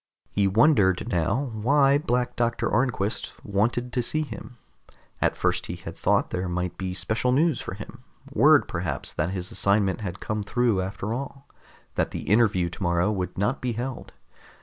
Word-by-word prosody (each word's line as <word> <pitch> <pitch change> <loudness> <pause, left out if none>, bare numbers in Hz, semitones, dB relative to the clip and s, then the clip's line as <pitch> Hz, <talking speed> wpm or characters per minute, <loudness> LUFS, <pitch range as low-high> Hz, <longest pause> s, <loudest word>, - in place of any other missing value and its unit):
He 100 -1 +2
wondered 105 - +3
now 115 - 0
why 135 +5 +3
Black 125 -3 -1
Doctor 120 0 0
Arnquist 120 -5 0
wanted 120 +5 0
to 125 - +1
see 155 +6 0
him. 125 -4 -9 0.6
At - - +2
first - - 0
he - - -4
had - - -8
thought - - +1
there 90 0 -2
might 90 0 -2
be 95 -1 -4
special 110 +5 0
news 150 0 +2
for - - -6
him, 115 +5 -10 0.3
word 145 -5 +5
perhaps 85 -6 -3
that 75 +3 -1
his 95 +2 -4
assignment 100 -1 +1
had 95 -2 -5
come 105 0 -2
through 115 -1 +1
after 95 +3 -3
all, 135 +2 -6 0.5
that - - 0
the - - -5
interview 105 -5 +3
tomorrow 85 +2 0
would 90 -3 -3
not 105 +8 0
be 125 -2 -1
held. 125 +2 -5
110 Hz, 170 wpm, -25 LUFS, 95-125 Hz, 0.6 s, word